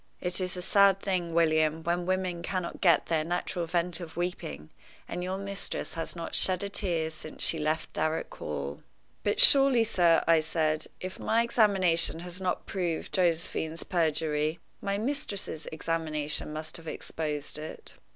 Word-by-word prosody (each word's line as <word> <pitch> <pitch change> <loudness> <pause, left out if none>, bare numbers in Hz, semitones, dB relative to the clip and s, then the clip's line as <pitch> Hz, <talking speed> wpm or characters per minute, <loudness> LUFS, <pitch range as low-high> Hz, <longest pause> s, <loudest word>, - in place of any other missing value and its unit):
It 180 +1 -3
is 185 0 -3
a 180 - -4
sad 200 0 +5
thing, 180 -4 -2
William, 155 -1 +2
when 175 +1 -1
women 185 -2 -1
cannot 180 0 -4
get 170 -5 +4
their 160 -2 0
natural 175 0 -3
vent 170 0 -1
of 170 -2 -9
weeping, 80 - -4 0.4
and 180 - -4
your 185 +1 -3
mistress 200 0 -5
has 165 +1 -5
not 170 -1 -6
shed 185 0 +3
a 200 - -3
tear 170 -6 -1
since 155 0 -7
she 160 - +1
left 155 +1 -2
Darrock 155 +1 -1
Hall." 70 -1 -5 0.4
"But 205 - 0
surely, 270 -4 +9
sir," 175 -7 +3
I 165 -1 +5
said, 155 -1 -1
"if 185 0 -7
my 230 +1 +2
examination 190 -8 +2
has 180 +1 -5
not 180 -1 -2
proved 175 -4 -3
Josephine's 165 -2 -1
perjury, 155 -2 0 0.2
my 200 0 -1
mistress's 210 - -4
examination 155 -2 -2
must 155 +1 -5
have 165 -1 -13
exposed 150 -2 -4
it?" 155 - -8
170 Hz, 160 wpm, -28 LUFS, 160-185 Hz, 0.4 s, surely